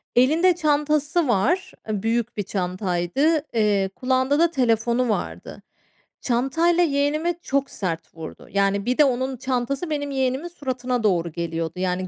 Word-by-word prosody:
Elinde 320 +9 +4
çantası 300 0 +1
var, 255 - +1 0.2
eee, 210 -2 -2
büyük 230 0 -1
bir 205 - -1
çantaydı. 185 - 0
Eee, 205 -4 +2
kulağında 260 +2 +1
da 335 0 +4
telefonu 240 -2 +1
vardı. 215 - -4 0.6
Çantayla 325 +8 +2
yeğenime 305 +3 +1
çok 275 -2 -1
sert 165 -5 -5
vurdu. 160 -1 -9
Yani, 200 0 +1
bir 250 +1 0
de 300 - +6
onun 260 0 -1
çantası 260 +5 -2
benim 285 -2 -2
yeğenimin 265 +4 -1
suratına 255 -6 -3
doğru 175 -5 +1
geliyordu. 165 -1 -3
Yani, 185 0 -1
255 Hz, 140 wpm, -23 LUFS, 200-290 Hz, 0.6 s, de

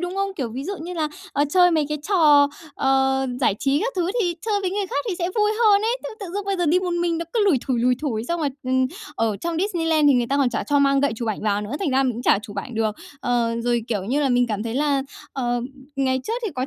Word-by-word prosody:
đúng 355 +1 -3
không? 395 0 -1
Kiểu 255 -5 -2
ví 260 +5 -6
dụ 395 - -3
như 355 +2 -6
là, 310 -3 -1 0.2
ờ, 290 - +2
chơi 355 +1 +5
mấy 310 -3 +1
cái 300 0 -2
trò, 295 -7 +5 0.3
ờ, 265 0 +2
giải 205 - +3
trí 275 +1 +1
các - - -1
thứ 355 +1 0
thì 350 -4 0
chơi 410 -2 +1
với 370 -2 -1
người 400 0 -1
khác 285 -4 -2
thì 370 - -1
sẽ 345 0 0
vui 420 0 +3
hơn 410 -1 +5
ấy, 470 +3 0
thế - - -4
tự 395 - -5
dưng 410 - -2
bây 395 -1 -1
giờ 350 - 0
đi 340 +4 +4
một 360 -1 -2
mình 340 -1 0
nó 335 - -3
cứ 445 -3 +2
lủi 345 -10 +4
thủi, 250 -4 0
lủi 250 +1 +3
thủi. 230 -6 -2
Xong 340 +4 -2
rồi, 290 - +1 0.2
ừm, 260 0 +2 0.3
ở 220 -3 0
trong 335 +5 -3
Disneyland 325 -6 +2
thì 275 - +5
người 240 -1 +2
ta 275 - 0
còn 270 -3 +2
chả 220 - -2
cho 290 -1 +2
mang 275 0 +3
gậy 280 -3 +1
chụp 230 -1 -3
ảnh 210 - -3
vào 205 -1 +1
nữa, 210 +3 -6
thành 365 -8 -1
ra 265 +1 +3
mình 255 -2 +1
cũng 235 - -6
chả 200 - +4
chụp 205 -2 -10
ảnh 235 +4 -5
được. 220 -1 0 0.2
Ờ, 235 -1 0
rồi, 240 -1 0
kiểu 205 -5 -1
như 270 +7 0
là, 280 - +2
mình 245 -1 +3
cảm 210 -2 -2
thấy 230 +1 -4
là, 280 -1 +1 0.3
ờ, 245 -2 -1 0.4
ngày 260 -1 +1
trước 445 - -3
thì 430 - -1
có 255 0 -2
280 Hz, 290 wpm, -23 LUFS, 245-350 Hz, 0.4 s, chơi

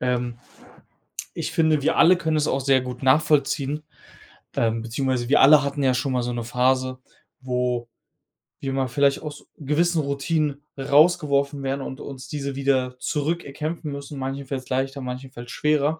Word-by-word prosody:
Ähm, 125 -1 -1 1.0
ich - - -3
finde, 160 -3 +2
wir 160 +3 +1
alle 180 +2 +7
können 160 -2 -1
es 150 -1 +1
auch 135 - 0
sehr 135 0 +3
gut 125 0 -7
nachvollziehen, 145 +1 +2 0.7
ähm, 115 -1 +1
beziehungsweise 125 +1 -1
wir 145 - +5
alle 145 +1 +8
hatten 140 0 -2
ja 130 -1 +3
schon 130 +2 -1
mal 125 - +1
so 120 0 -2
'ne 120 - -3
Phase, 130 +2 +1 0.4
wo 125 -2 -1 0.7
wir 135 -1 -3
mal 135 -1 0
vielleicht 140 +2 +2
aus 150 -1 -8
gewissen 160 +3 +1
Routinen 145 +1 -1 0.2
rausgeworfen 140 -1 +3
werden 135 +1 -2
und 130 - -6
uns 135 -2 -8
diese 140 -2 -4
wieder 130 -2 0
zurück 155 +6 -1
erkämpfen 155 +2 -4
müssen, 140 0 -7
manchen 135 +1 -4
fällt's 130 -1 -5
leichter, 135 +1 -1
manchen 130 +1 -6
fällt's 120 -1 -9
schwerer. 150 +1 +1
140 Hz, 165 wpm, -24 LUFS, 130-150 Hz, 1.0 s, alle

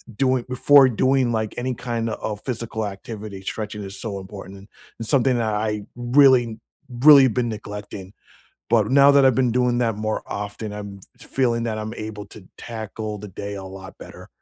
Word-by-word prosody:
doing 130 0 +1
before 135 +2 +6
doing, 130 +1 +2
like, 110 -2 -2
any 125 +1 -2
kind 115 -2 -3
of 105 -1 -4
physical 115 -3 -3
activity, 100 0 -7
stretching 105 +1 -5
is 95 +1 -7
so 100 -4 -4
important 95 0 -11 0.3
and 115 - -5
something 130 -1 +3
that 110 -3 0
I 105 -1 -2
really, 120 -2 +4 0.3
really 135 +2 +7
been 120 0 -1
neglecting. 105 -2 -8 0.6
But - - +3
now 140 +1 +7
that 140 -1 +5
I've 130 - +5
been 125 -1 +2
doing 125 0 +1
that 115 -3 0
more 110 0 -2
often, 105 +1 -5
I'm 100 -1 -8 0.2
f - - -12
feeling 120 -3 0
that 110 -2 -2
I'm 110 0 -5
able 110 -2 -7
to 100 -1 -14
tackle 110 -2 -6
the 105 - -8
day 100 +2 -6
a 95 -1 -7
lot 95 0 -11
better. - - -12
110 Hz, 180 wpm, -22 LUFS, 105-125 Hz, 0.6 s, really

